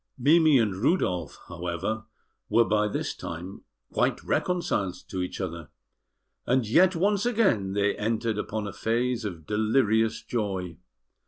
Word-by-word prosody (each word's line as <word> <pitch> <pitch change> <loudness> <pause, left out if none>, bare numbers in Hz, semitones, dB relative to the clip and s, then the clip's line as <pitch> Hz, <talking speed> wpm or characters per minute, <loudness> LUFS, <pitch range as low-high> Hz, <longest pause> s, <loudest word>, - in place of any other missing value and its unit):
Mimi 155 +2 +5
and 110 -6 +1
Rudolf, 95 - 0
however, 90 +6 -3 0.4
were 115 +2 +4
by 105 0 +2
this 105 - -2
time 90 +4 -7 0.3
quite - - +1
reconciled 175 - 0
to 95 - -3
each 90 - -4
other, 85 -5 -5 0.8
and 125 -2 +2
yet 180 - +4
once 200 +4 +2
again 195 - +2
they 100 0 +1
entered 110 0 -1
upon 105 0 -3
a 100 - -5
phase 120 +1 -1
of 85 -6 -6
delirious 110 +1 +1
joy. 95 -7 -3
110 Hz, 135 wpm, -27 LUFS, 95-125 Hz, 0.8 s, Mimi